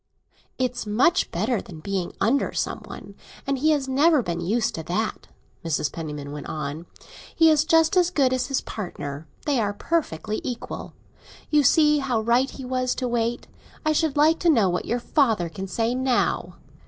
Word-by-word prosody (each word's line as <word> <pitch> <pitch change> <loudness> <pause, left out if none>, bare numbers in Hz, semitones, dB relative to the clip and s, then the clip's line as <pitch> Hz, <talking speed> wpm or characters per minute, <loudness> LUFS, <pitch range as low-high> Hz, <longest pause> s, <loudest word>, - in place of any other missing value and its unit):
"It's 250 -3 -2
much 265 - +3
better 215 +5 -1
than 165 -4 -11
being 190 +1 -3
under 265 +6 +1
some - - -2
one; - - -10 0.3
and 275 -1 -1
he 310 +4 +3
has 290 -3 +1
never 285 +1 +4
been 170 -2 -3
used 220 +5 0
to 160 - -4
that," 215 +6 -2 0.4
Mrs. 150 -3 -1
Penniman 150 -3 -6
went 145 -1 -7
on. 155 +2 -5 0.5
"He 325 -1 +6
is 305 -1 +4
just 325 +2 +4
as 355 -1 +4
good 275 -7 +2
as 255 -1 0
his 275 -2 0
partner—they 160 - -4
are 205 -2 0
perfectly 215 - -2
equal! 245 -2 -6 0.6
You 300 -1 +5
see 300 +2 +4
how 255 -5 0
right 240 +4 +2
he 265 - -8
was 255 0 -1
to 255 - -2
wait. 235 0 -1 0.4
I 310 - +3
should 310 -1 +1
like 315 +3 +4
to 345 - +2
know 220 - +4
what 180 - -2
your 240 - 0
father 225 - +1
can 190 +4 -6
say 225 +5 0
now! 255 -1 0
245 Hz, 180 wpm, -24 LUFS, 190-285 Hz, 0.6 s, He